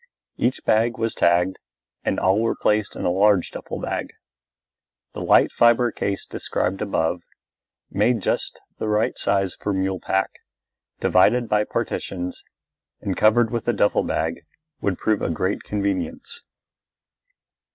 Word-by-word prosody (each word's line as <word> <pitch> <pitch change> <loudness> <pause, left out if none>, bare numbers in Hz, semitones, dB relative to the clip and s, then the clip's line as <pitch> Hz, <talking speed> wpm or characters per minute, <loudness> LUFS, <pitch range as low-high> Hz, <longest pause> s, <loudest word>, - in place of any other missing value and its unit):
Each 125 +2 -1
bag 115 +2 +2
was 115 0 -1
tagged 90 +2 +2 0.4
and - - 0
all 95 +3 +3
were 115 - +1
placed 105 -1 0
in - - -5
the 90 - +2
large 100 0 +3
duffel - - -6
bag. - - -4 1.0
The - - -6
light - - +4
fibre 120 0 +4
case 100 -2 -3
described 95 +2 -2
above, 90 -4 0 0.7
made 120 -1 +2
just - - -1 0.2
the - - -2
right 105 +1 +1
size 95 -2 0
for 100 - -3
mule 95 -1 -1
pack, 95 +2 -1 0.6
divided 115 +7 +3
by 105 -1 +2
partitions, 90 -3 -4 0.6
and 95 - -3
covered 110 +1 +4
with 120 -1 -3
a 120 - +3
duffel 105 - +2
bag, 80 +1 -2 0.4
would 95 -3 0
prove 110 -2 0
a - - -1
great 95 +5 -1
convenience. 105 - -3
100 Hz, 140 wpm, -23 LUFS, 95-115 Hz, 1.0 s, light